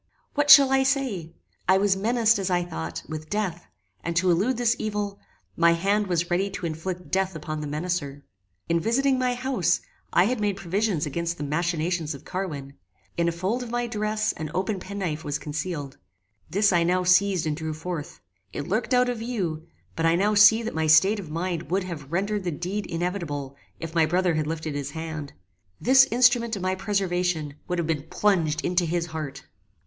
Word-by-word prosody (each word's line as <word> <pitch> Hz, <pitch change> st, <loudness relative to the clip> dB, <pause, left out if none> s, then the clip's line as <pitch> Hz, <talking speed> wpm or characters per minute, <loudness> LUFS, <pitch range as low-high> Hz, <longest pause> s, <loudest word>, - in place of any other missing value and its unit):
What 290 Hz, 0 st, +1 dB
shall 275 Hz, -2 st, +10 dB
I 270 Hz, 0 st, +4 dB
say! 265 Hz, -, -1 dB, 0.4 s
I 190 Hz, -, +6 dB
was 195 Hz, 0 st, +3 dB
menaced, 225 Hz, +2 st, +2 dB
as 190 Hz, -1 st, -1 dB
I 175 Hz, -1 st, +2 dB
thought, 80 Hz, -, -5 dB
with 155 Hz, 0 st, -7 dB
death, 190 Hz, -5 st, -2 dB, 0.4 s
and, 170 Hz, 0 st, -3 dB
to 180 Hz, +1 st, +3 dB
elude 210 Hz, +9 st, +1 dB
this 240 Hz, -1 st, +2 dB
evil, 205 Hz, -2 st, -3 dB, 0.4 s
my 170 Hz, 0 st, +5 dB
hand 200 Hz, +4 st, +1 dB
was 175 Hz, -1 st, -1 dB
ready 190 Hz, +3 st, +1 dB
to 190 Hz, -2 st, -6 dB
inflict 175 Hz, +3 st, -5 dB
death 190 Hz, -1 st, 0 dB
upon 155 Hz, 0 st, -5 dB
the 150 Hz, -, -4 dB
menacer. 145 Hz, -2 st, -3 dB, 0.4 s
In 170 Hz, 0 st, +2 dB
visiting 260 Hz, +7 st, +2 dB
my 250 Hz, -1 st, +1 dB
house, 245 Hz, -9 st, +1 dB, 0.3 s
I 175 Hz, -, +5 dB
had 240 Hz, +4 st, 0 dB
made 205 Hz, -2 st, 0 dB
provision 195 Hz, +1 st, 0 dB
against 170 Hz, +4 st, -3 dB
the -, -, -5 dB
machinations 165 Hz, +1 st, -1 dB
of 140 Hz, -, -13 dB
Carwin. 150 Hz, -8 st, -5 dB, 0.4 s
In 170 Hz, 0 st, +1 dB
a -, -, +2 dB
fold 190 Hz, +9 st, -2 dB
of 245 Hz, -, -6 dB
my 240 Hz, +1 st, -1 dB
dress 215 Hz, -1 st, -1 dB
an 155 Hz, -1 st, -5 dB
open 190 Hz, +1 st, -1 dB
penknife 180 Hz, -5 st, -4 dB
was 145 Hz, 0 st, -2 dB
concealed. 150 Hz, -2 st, -5 dB, 0.5 s
This 200 Hz, +3 st, +3 dB
I 175 Hz, -, +4 dB
now 180 Hz, +2 st, +2 dB
seized 180 Hz, -1 st, +3 dB
and 155 Hz, -1 st, -1 dB
drew 160 Hz, 0 st, -4 dB
forth. 160 Hz, -, -6 dB, 0.3 s
It 145 Hz, -, -5 dB
lurked 220 Hz, +7 st, 0 dB
out 250 Hz, 0 st, +4 dB
of 245 Hz, -2 st, -2 dB
view: 180 Hz, -9 st, -3 dB, 0.3 s
but 165 Hz, 0 st, +1 dB
I 165 Hz, -, +4 dB
now 205 Hz, +4 st, +2 dB
see 215 Hz, +2 st, +7 dB
that 230 Hz, -, -4 dB
my 160 Hz, 0 st, 0 dB
state 190 Hz, +8 st, +5 dB
of 175 Hz, -6 st, -8 dB
mind 170 Hz, +1 st, -3 dB
would 190 Hz, +2 st, +1 dB
have 160 Hz, -6 st, -7 dB
rendered 200 Hz, +3 st, -1 dB
the 180 Hz, -, -1 dB
deed 180 Hz, +6 st, -4 dB
inevitable 165 Hz, -6 st, -3 dB, 0.2 s
if 165 Hz, -1 st, -6 dB
my 165 Hz, -2 st, +3 dB
brother 180 Hz, +1 st, +2 dB
had 155 Hz, -1 st, -1 dB
lifted 160 Hz, -1 st, -3 dB
his 145 Hz, -1 st, -3 dB
hand. 160 Hz, -3 st, -5 dB, 0.5 s
This 265 Hz, +2 st, +6 dB
instrument 240 Hz, -1 st, +3 dB
of 195 Hz, -, -5 dB
my 185 Hz, 0 st, +1 dB
preservation 180 Hz, -6 st, -1 dB
would 180 Hz, -, -1 dB
have 170 Hz, -, 0 dB
been 155 Hz, -1 st, -2 dB
plunged 170 Hz, -7 st, +1 dB
into 180 Hz, 0 st, +1 dB
his 170 Hz, +1 st, -1 dB
heart. 155 Hz, -4 st, -6 dB
180 Hz, 195 wpm, -25 LUFS, 160-210 Hz, 0.5 s, shall